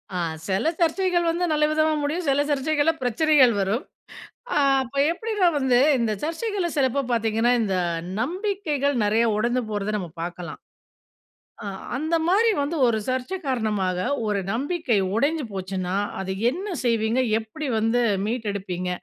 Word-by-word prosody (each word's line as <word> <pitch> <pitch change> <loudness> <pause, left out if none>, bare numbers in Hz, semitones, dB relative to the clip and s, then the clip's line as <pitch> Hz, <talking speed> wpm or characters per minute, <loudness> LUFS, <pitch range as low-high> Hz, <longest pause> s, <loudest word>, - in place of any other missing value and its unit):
ஆ. - - -1 0.3
சில 195 +12 +1
சர்ச்சைகள் 345 0 +2
வந்து 350 +2 0
நல்ல 300 0 +3
விதமா 310 0 +2
முடியும். 310 +3 -2
சில 275 +1 +3
சர்ச்சைகள்ல 295 +3 +2
பிரச்சனைகள் 260 +1 +4
வரும். 205 +8 -1 0.7
ஆ. - - -1 0.3
அப்போ 265 +2 -6
எப்படி 440 +6 -5
நான் 340 -4 +4
வந்து 255 -2 +3 0.2
இந்த 230 -2 0
சர்ச்சைகள்ல 350 +2 -2
சிலப்போ 275 0 +2
பார்த்தீங்கனா, 225 +1 +2
இந்த 200 -3 -1 0.5
நம்பிக்கைகள் 310 - -1
நிறைய 220 +3 +3
உடைந்து 240 +3 +1
போறதை 210 0 -2
நம்ம 180 -4 -6
பார்க்கலாம். 175 0 -6 1.1
அ - - -6 0.3
அந்த 315 +5 0
மாதிரி 420 +6 +4
வந்து 295 +4 -2
ஒரு 235 -2 +2
சர்ச்சை 260 +8 -2
காரணமாக, 210 -8 0 0.3
ஒரு 205 -1 0
நம்பிக்கை 275 - 0 0.2
உடைஞ்சு 290 +6 +1
போச்சுன்னா 185 -1 -3 0.3
அதை 190 0 -3 0.2
என்ன 365 +10 -5 0.2
செய்வீங்க? 230 0 +1 0.2
எப்படி 225 +8 -6
வந்து 225 +3 +2 0.2
மீட்டு 225 0 -2
எடுப்பீங்க? 185 -2 -4
255 Hz, 140 wpm, -24 LUFS, 215-315 Hz, 1.1 s, பிரச்சனைகள்